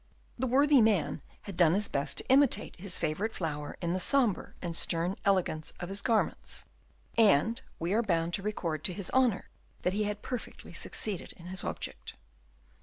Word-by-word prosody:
The 260 Hz, -, +1 dB
worthy 280 Hz, +2 st, +5 dB
man 215 Hz, -6 st, +2 dB, 0.2 s
had 200 Hz, -, -7 dB
done 170 Hz, -1 st, +5 dB
his 205 Hz, 0 st, +1 dB
best 140 Hz, 0 st, -2 dB
to -, -, -1 dB
imitate 265 Hz, -5 st, +3 dB
his 185 Hz, 0 st, -2 dB
favourite 200 Hz, +9 st, -2 dB
flower 150 Hz, -4 st, -4 dB
in 170 Hz, 0 st, 0 dB
the 185 Hz, -, 0 dB
sombre 240 Hz, -1 st, +3 dB
and 170 Hz, -2 st, -4 dB
stern 170 Hz, +3 st, +1 dB
elegance 180 Hz, -6 st, +1 dB
of 175 Hz, -, -5 dB
his 195 Hz, +1 st, -2 dB
garments; 230 Hz, -3 st, -1 dB, 0.5 s
and 225 Hz, -, +4 dB, 0.2 s
we 170 Hz, +4 st, -1 dB
are 225 Hz, -, +3 dB
bound 170 Hz, -5 st, 0 dB
to 195 Hz, -, +5 dB
record, 170 Hz, -7 st, -3 dB
to 180 Hz, -, +1 dB
his 195 Hz, 0 st, -4 dB
honour, 255 Hz, -6 st, +2 dB, 0.4 s
that 180 Hz, -, +1 dB
he 210 Hz, +1 st, 0 dB
had 205 Hz, 0 st, -4 dB
perfectly 250 Hz, -3 st, -6 dB
succeeded 205 Hz, -5 st, -1 dB
in 170 Hz, -, -13 dB
his 185 Hz, +1 st, -5 dB
object. -, -, -5 dB
195 Hz, 180 wpm, -30 LUFS, 170-225 Hz, 0.5 s, worthy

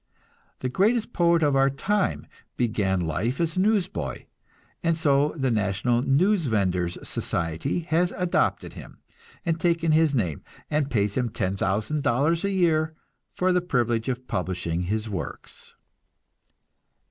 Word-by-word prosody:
The 130 Hz, -, -1 dB
greatest 220 Hz, -, +1 dB
poet 170 Hz, -2 st, +3 dB
of 145 Hz, -2 st, +3 dB
our 135 Hz, 0 st, +4 dB
time 200 Hz, +8 st, -1 dB, 0.3 s
began 105 Hz, -6 st, 0 dB
life 95 Hz, -, -1 dB
as 165 Hz, -2 st, 0 dB
a -, -, 0 dB
newsboy, 200 Hz, -2 st, 0 dB, 0.6 s
and 165 Hz, -1 st, +1 dB
so 145 Hz, -2 st, +2 dB
the 135 Hz, -3 st, 0 dB
National 105 Hz, +3 st, +1 dB
Newsvenders' 125 Hz, -, +1 dB
Society 85 Hz, -, -2 dB
has 170 Hz, +1 st, +1 dB
adopted 180 Hz, -2 st, 0 dB
him, -, -, -11 dB, 0.5 s
and 165 Hz, -1 st, 0 dB
taken 170 Hz, -1 st, +1 dB
his 155 Hz, -2 st, +3 dB
name, 90 Hz, -, -1 dB, 0.3 s
and 150 Hz, -2 st, +1 dB
pays 105 Hz, -5 st, +1 dB
him 125 Hz, -2 st, 0 dB
ten 95 Hz, -3 st, -2 dB
thousand 105 Hz, +10 st, -1 dB
dollars 145 Hz, +8 st, +1 dB
a 200 Hz, -, +1 dB
year 160 Hz, -4 st, +1 dB, 0.4 s
for 185 Hz, 0 st, +2 dB
the 180 Hz, -, +2 dB
privilege 120 Hz, -8 st, 0 dB
of 125 Hz, 0 st, -4 dB
publishing 90 Hz, -2 st, -2 dB
his 110 Hz, +4 st, -2 dB
works. 95 Hz, -8 st, -7 dB
135 Hz, 135 wpm, -25 LUFS, 105-170 Hz, 0.6 s, our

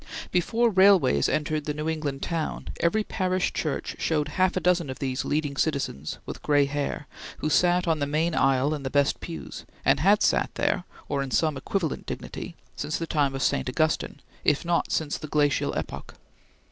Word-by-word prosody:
Before 225 Hz, +6 st, +2 dB
railways 190 Hz, -, +5 dB
entered 155 Hz, 0 st, -1 dB
the 150 Hz, -, -2 dB
New 150 Hz, +1 st, -3 dB
England 150 Hz, -4 st, -2 dB
town, 165 Hz, -2 st, -3 dB
every 215 Hz, +6 st, +2 dB
parish 185 Hz, -3 st, -1 dB
church 150 Hz, -4 st, -2 dB
showed 150 Hz, -2 st, 0 dB
half 185 Hz, +4 st, +1 dB
a -, -, +3 dB
dozen 180 Hz, -4 st, +2 dB
of 130 Hz, -, -5 dB
these 130 Hz, -1 st, -2 dB
leading 145 Hz, -2 st, -1 dB
citizens, 135 Hz, -, -1 dB
with -, -, -7 dB
gray 145 Hz, -1 st, +3 dB
hair, 145 Hz, +1 st, -3 dB, 0.3 s
who 155 Hz, -, -2 dB
sat 180 Hz, +2 st, +3 dB
on 160 Hz, -2 st, +2 dB
the 140 Hz, -, 0 dB
main 160 Hz, +3 st, 0 dB
aisle 135 Hz, +2 st, +3 dB
in 150 Hz, -, -4 dB
the 135 Hz, -, -3 dB
best 140 Hz, +1 st, +2 dB
pews, 170 Hz, -, -7 dB, 0.2 s
and -, -, +4 dB
had -, -, +4 dB
sat -, -, +2 dB
there, -, -, 0 dB, 0.2 s
or 140 Hz, -1 st, -1 dB
in 135 Hz, -, -3 dB
some 155 Hz, +3 st, +1 dB
equivalent 160 Hz, +4 st, -2 dB
dignity, -, -, -6 dB, 0.2 s
since 155 Hz, -, -2 dB
the 165 Hz, -, -3 dB
time 145 Hz, -4 st, +1 dB
of 135 Hz, -, -2 dB
St. 125 Hz, -, +1 dB
Augustine, 155 Hz, +4 st, 0 dB, 0.2 s
if 150 Hz, +2 st, +2 dB
not 170 Hz, 0 st, +1 dB
since 150 Hz, -2 st, -1 dB
the 155 Hz, -, -6 dB
glacial 145 Hz, -1 st, +1 dB
epoch. -, -, -6 dB
150 Hz, 185 wpm, -26 LUFS, 140-170 Hz, 0.3 s, railways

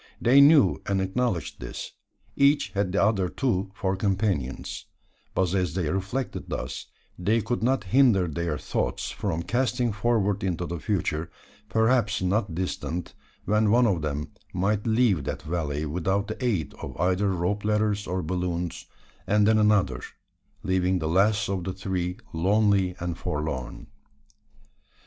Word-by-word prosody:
They 130 Hz, +4 st, +6 dB
knew 140 Hz, -, +6 dB
and 100 Hz, -1 st, +1 dB
acknowledged 95 Hz, -, -1 dB
this. -, -, -6 dB, 0.4 s
Each 140 Hz, +1 st, +3 dB
had 100 Hz, -2 st, -1 dB
the 100 Hz, -, +2 dB
other 100 Hz, -3 st, +2 dB
two 100 Hz, -7 st, -1 dB
for 95 Hz, -1 st, -1 dB
companions; 95 Hz, -, -2 dB, 0.5 s
but 90 Hz, 0 st, +1 dB
as 90 Hz, -4 st, 0 dB
they 85 Hz, -6 st, 0 dB
reflected 100 Hz, +7 st, -3 dB
thus, -, -, -4 dB, 0.3 s
they 105 Hz, +6 st, +2 dB
could 120 Hz, +2 st, -2 dB
not 130 Hz, 0 st, +1 dB
hinder 105 Hz, -3 st, +4 dB
their 85 Hz, -1 st, -2 dB
thoughts -, -, -2 dB
from 85 Hz, -5 st, -2 dB
casting 120 Hz, +1 st, 0 dB
forward 105 Hz, -1 st, 0 dB
into 90 Hz, -2 st, -1 dB
the 85 Hz, -1 st, -4 dB
future 85 Hz, -4 st, -1 dB, 0.4 s
perhaps 110 Hz, -1 st, +2 dB
not 95 Hz, -1 st, 0 dB
distant 90 Hz, -1 st, -3 dB, 0.3 s
when 105 Hz, +1 st, +2 dB
one 120 Hz, +3 st, +5 dB
of 95 Hz, -8 st, +1 dB
them 75 Hz, 0 st, -3 dB, 0.2 s
might 100 Hz, +4 st, 0 dB
leave 110 Hz, -, +3 dB
that 75 Hz, 0 st, -4 dB
valley 75 Hz, -2 st, -2 dB
without 95 Hz, +6 st, -1 dB
the 110 Hz, -, -5 dB
aid 105 Hz, -10 st, 0 dB
of -, -, -7 dB
either 95 Hz, +3 st, +2 dB
rope 95 Hz, +3 st, -1 dB
ladders 105 Hz, -1 st, 0 dB
or 90 Hz, 0 st, -2 dB
balloons; 85 Hz, 0 st, -3 dB, 0.4 s
and 105 Hz, 0 st, +4 dB
then 110 Hz, 0 st, +4 dB
another 100 Hz, -12 st, +3 dB, 0.6 s
leaving 95 Hz, 0 st, +1 dB
the 80 Hz, -3 st, -2 dB
last 100 Hz, +5 st, +3 dB
of 95 Hz, -2 st, -2 dB
the 95 Hz, +1 st, -3 dB
three 90 Hz, -1 st, -3 dB, 0.2 s
lonely 95 Hz, +1 st, +2 dB
and 85 Hz, -1 st, -4 dB
forlorn! 75 Hz, -5 st, -4 dB
95 Hz, 145 wpm, -26 LUFS, 85-105 Hz, 0.6 s, They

